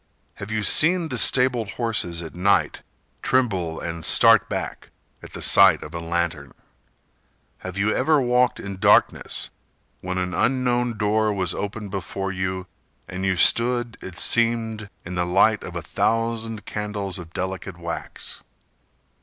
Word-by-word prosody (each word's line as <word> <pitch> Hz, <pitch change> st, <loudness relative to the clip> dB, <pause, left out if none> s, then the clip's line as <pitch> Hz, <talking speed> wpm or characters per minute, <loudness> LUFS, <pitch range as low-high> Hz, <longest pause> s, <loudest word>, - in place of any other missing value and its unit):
Have 100 Hz, +1 st, -8 dB
you 110 Hz, -1 st, -2 dB
seen 165 Hz, -, +4 dB
the 125 Hz, -3 st, -2 dB
stabled 125 Hz, -3 st, +3 dB
horses 95 Hz, -8 st, -1 dB
at 80 Hz, -, -9 dB
night 95 Hz, +3 st, +1 dB, 0.4 s
Tremble 95 Hz, -11 st, 0 dB
and 85 Hz, -1 st, -6 dB
start -, -, +5 dB
back -, -, -5 dB, 0.3 s
at -, -, -13 dB
the -, -, -5 dB
sight 95 Hz, -5 st, +5 dB
of 75 Hz, -, -10 dB
a 85 Hz, -, -4 dB
lantern? 85 Hz, -3 st, -3 dB, 1.1 s
Have 95 Hz, 0 st, -7 dB
you 105 Hz, +2 st, +1 dB
ever 150 Hz, +3 st, +3 dB
walked 125 Hz, -1 st, +1 dB
in 100 Hz, -1 st, -7 dB
darkness -, -, +2 dB, 0.5 s
When 95 Hz, 0 st, -4 dB
an 90 Hz, 0 st, -2 dB
unknown 125 Hz, -2 st, 0 dB
door 105 Hz, +1 st, +1 dB
was 95 Hz, -4 st, -1 dB
open 105 Hz, 0 st, -5 dB
before 95 Hz, 0 st, -4 dB
you 95 Hz, 0 st, -3 dB, 0.4 s
And 95 Hz, +1 st, -6 dB
you 95 Hz, -1 st, 0 dB
stood, 120 Hz, +4 st, +3 dB
it 95 Hz, -1 st, -9 dB
seemed, 115 Hz, -2 st, +1 dB, 0.2 s
in 90 Hz, -, -6 dB
the 90 Hz, 0 st, 0 dB
light 100 Hz, +4 st, +3 dB
of 90 Hz, -, -8 dB
a 85 Hz, -, -4 dB
thousand 115 Hz, +1 st, -1 dB
candles 105 Hz, -2 st, -4 dB
Of 85 Hz, -2 st, -11 dB
delicate 95 Hz, -1 st, -5 dB
wax? 85 Hz, -1 st, -6 dB
100 Hz, 145 wpm, -23 LUFS, 90-115 Hz, 1.1 s, start